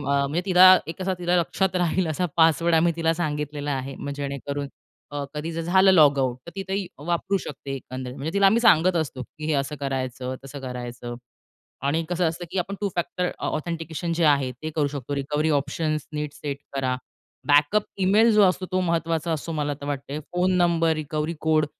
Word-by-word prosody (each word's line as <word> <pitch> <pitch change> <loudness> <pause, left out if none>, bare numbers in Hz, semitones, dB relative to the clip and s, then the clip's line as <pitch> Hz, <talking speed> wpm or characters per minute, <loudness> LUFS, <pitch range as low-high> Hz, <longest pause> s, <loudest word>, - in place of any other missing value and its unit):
म्हणजे 140 +3 0
तिला 185 0 +8
एक 165 +3 -7
असा 185 0 0
तिला 175 0 +1
लक्षात 185 +2 0
राहील 180 0 +1
असा 170 +4 0
पासवर्ड 165 +1 +4
आम्ही 170 +1 +4
तिला 165 -1 +2
सांगितलेला 150 -3 -3
आहे. 135 0 -4 0.2
जेणेकरून 140 0 -4 0.4
अ, 145 -1 -3
कधी 155 +3 -4
जर 165 - -3
झालं 190 +3 +5
लॉगआउट 140 -7 +4
तर - - -7
ती 195 - -2
ते 195 0 -1 0.2
वापरू 175 +3 0
शकते 140 -5 -6
एकंदरीत. 130 -1 -7
म्हणजे 145 +4 -4
तिला 200 0 +5
आम्ही 220 +4 +4
सांगत 185 -5 +5
असतो, 145 -5 -2
की 155 +5 -9
हे 155 - +1
असं 140 +1 -1
करायचं 130 -2 -3
तसं 135 +1 -8
करायचं. 120 -2 -6 0.7
आणि 150 +4 +1
कसं 180 0 +1
असतं 170 +2 -4
की - - -3
आपण 195 +3 -3
टू 200 - 0
फॅक्टर 180 +1 -1 0.2
ऑथेंटिकेशन 165 +1 -3
जे 170 0 0
आहे 140 -4 +3
ते 155 +6 -7
करू 150 -3 +2
शकतो. 140 0 -5
रिकव्हरी 150 +3 -1
ऑप्शन्स 155 0 -3
नीट 150 -1 -3
सेट 140 -2 -5 0.2
करा. 130 -2 0 0.5
बॅकअप 145 +8 +4 0.2
ईमेल 210 +5 +5
जो 210 -1 +6
असतो 185 0 +2
तो 185 - +1
महत्त्वाचा 165 -1 0
असतो 160 +2 -4
मला 150 -2 -1
तर - - -6
वाटतंय. 140 +1 -4
Phone 180 +1 +2
number, 170 -2 +3
recovery 155 +1 -2
code 155 -1 +3
155 Hz, 185 wpm, -24 LUFS, 140-175 Hz, 0.7 s, तिला